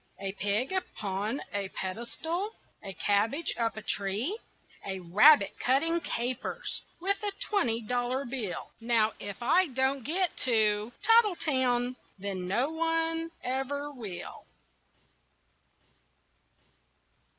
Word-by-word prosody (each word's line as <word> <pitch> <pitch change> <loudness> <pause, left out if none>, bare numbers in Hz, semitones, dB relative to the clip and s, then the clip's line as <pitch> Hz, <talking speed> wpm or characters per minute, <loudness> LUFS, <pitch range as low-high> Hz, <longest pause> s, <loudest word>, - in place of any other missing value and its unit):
A 195 0 -2
pig 205 - 0
upon 215 - -2
a 200 -1 -2
pedestal, 320 - -4 0.3
A 195 - -5
cabbage 205 - +1
up 230 -2 -1
a 220 - -6
tree, 205 - 0 0.5
A 190 -1 -4
rabbit 200 - +6
cutting 325 +7 +2
capers 245 -1 -2 0.2
With 395 +4 0
a 415 -1 -1
twenty 235 - 0
dollar 245 +4 -1
bill 235 -7 -4
Now 225 -2 +2
if 205 +3 -6
I 365 +9 +4
don't 265 0 0
get 350 +7 +1
to 215 -3 +2
Tattletown 260 - +3 0.2
Then 190 -2 -4
no 240 +10 +1
one 325 0 0
ever 275 +3 -2
will. 210 -10 -8
245 Hz, 105 wpm, -29 LUFS, 205-315 Hz, 0.5 s, rabbit